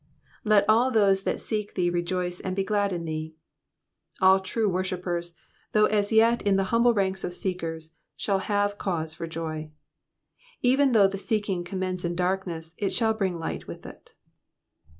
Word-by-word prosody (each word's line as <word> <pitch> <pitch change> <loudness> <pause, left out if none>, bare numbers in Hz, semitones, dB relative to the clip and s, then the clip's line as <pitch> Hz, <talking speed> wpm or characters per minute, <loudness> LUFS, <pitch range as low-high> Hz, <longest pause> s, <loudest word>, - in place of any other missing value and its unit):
^''Let 210 -2 +4
all 230 +4 +4
those 200 -5 +3
tliat - - 0
seek 210 -2 -4
thee 175 -2 +1
rejoice 175 +1 -2
and 185 0 -4
he 195 - +2
glad 205 -1 0
in 170 -2 -3
thee.'*'* 155 0 -5 0.8
All 190 0 +6
true 210 +3 -1
worshippers, 180 -2 -2 0.4
though 215 0 +5
as 205 -1 +1
yet 230 +2 +4
in 200 -1 +2
the 195 - +2
humble 235 +1 +5
ranks 190 -1 0
of 175 - -3
seekers, 165 -4 -4 0.2
shall 195 -2 0
have 205 0 0
cause 160 -4 -2
for 165 +1 -6
joy. 155 -1 -5 0.9
Even 265 +1 +4
though 205 -3 +6
the 195 0 -5
seeking 205 -4 -1
commence 185 0 -3
in 170 0 -2
darkness, 180 -3 -2
it 200 - 0
shall 225 -2 +2
bring 190 -5 -1
light 165 - -5
with - - -9
it. - - -13
190 Hz, 170 wpm, -26 LUFS, 175-205 Hz, 0.9 s, All